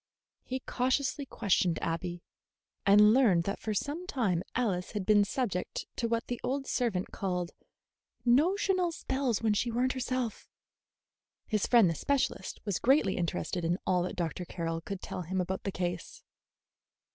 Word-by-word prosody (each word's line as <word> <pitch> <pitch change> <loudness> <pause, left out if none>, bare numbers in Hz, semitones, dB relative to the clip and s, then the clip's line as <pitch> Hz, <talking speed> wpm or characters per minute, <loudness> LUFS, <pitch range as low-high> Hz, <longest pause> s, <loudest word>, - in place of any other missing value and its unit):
He 260 +1 -4
cautiously 265 +3 0
questioned 185 -7 +1
Abby, 170 +1 -3 0.6
and 210 +2 +7
learned 215 -10 +4
that 200 +3 -3
for 215 -1 -3
some 310 - -3
time 205 - 0
Alice 200 -7 -1
had 205 -3 -2
been 210 0 +5
subject 200 -4 -2
to 235 - 0
what 230 +1 -1
the 245 -1 -4
old 270 +2 -1
servant 225 -10 -1
called 180 -3 -2 0.7
"notional 360 +7 +3
spells 265 -7 -1
when 220 -2 +3
she 230 +3 0
were 240 +2 0
n't 255 - +1
herself." 255 -3 -3 1.0
His 215 -3 0
friend 235 -5 +6
the 165 - +1
specialist 260 - -1
was 200 -4 -1
greatly 255 -7 +3
interested 175 0 -2
in 170 +2 +1
all 180 -1 +2
that 180 - -3
Dr. 175 +1 -2
Carroll 165 -1 -3
could 195 +2 -6
tell - - -4
him 185 +2 -2
about 190 +1 -2
the 195 - -1
case. 180 - -4
210 Hz, 160 wpm, -30 LUFS, 180-255 Hz, 1.0 s, and